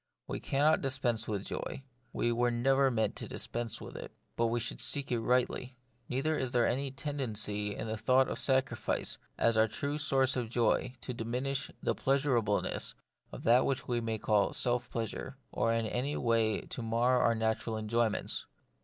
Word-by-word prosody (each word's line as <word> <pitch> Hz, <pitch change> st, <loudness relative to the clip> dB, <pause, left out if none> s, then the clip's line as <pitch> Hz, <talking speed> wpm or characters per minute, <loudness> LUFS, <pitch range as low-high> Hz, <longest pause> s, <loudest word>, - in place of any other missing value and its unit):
We -, -, -4 dB
cannot 150 Hz, +3 st, +2 dB
dispense 120 Hz, -4 st, 0 dB
with 100 Hz, -2 st, -2 dB
joy; 135 Hz, -, -5 dB, 0.3 s
we 120 Hz, -, +1 dB
were 120 Hz, +1 st, +2 dB
never 135 Hz, +3 st, +3 dB
meant 110 Hz, -4 st, 0 dB
to -, -, -5 dB
dispense 115 Hz, -2 st, -4 dB
with -, -, -9 dB
it; -, -, -7 dB, 0.2 s
but 115 Hz, -, +2 dB
we 120 Hz, +1 st, 0 dB
should 120 Hz, -, -4 dB
seek 140 Hz, -2 st, 0 dB
it 120 Hz, -, +2 dB
rightly. 125 Hz, +2 st, 0 dB, 0.3 s
Neither 135 Hz, +5 st, 0 dB
is 130 Hz, -1 st, -2 dB
there 120 Hz, -1 st, +4 dB
any 135 Hz, +2 st, 0 dB
tendency 110 Hz, -7 st, -2 dB
in -, -, -4 dB
the 110 Hz, 0 st, -3 dB
thought 130 Hz, +4 st, +4 dB
of -, -, -3 dB
sacrifice 130 Hz, -3 st, +1 dB, 0.2 s
as 115 Hz, -, +3 dB
the 110 Hz, 0 st, +4 dB
true 145 Hz, +6 st, -3 dB
source 135 Hz, -2 st, +3 dB
of 120 Hz, -3 st, -2 dB
joy 120 Hz, +1 st, +1 dB
to 125 Hz, -, -4 dB
diminish 125 Hz, +5 st, -2 dB
the -, -, +2 dB
pleasurableness 130 Hz, -7 st, 0 dB, 0.4 s
of -, -, -8 dB
that 120 Hz, +3 st, +5 dB
which 135 Hz, -2 st, -1 dB
we 120 Hz, -1 st, 0 dB
may 115 Hz, -1 st, -1 dB
call 105 Hz, -1 st, +2 dB
self 120 Hz, -1 st, +1 dB
pleasure, 120 Hz, +3 st, -4 dB
or 115 Hz, -, +1 dB
in 115 Hz, 0 st, +1 dB
any 125 Hz, +6 st, -1 dB
way 115 Hz, -2 st, +2 dB
to -, -, -7 dB
mar 120 Hz, +2 st, +2 dB
our 115 Hz, -1 st, +3 dB
natural 110 Hz, 0 st, -1 dB
enjoyments. 110 Hz, 0 st, 0 dB
120 Hz, 180 wpm, -32 LUFS, 115-130 Hz, 0.4 s, that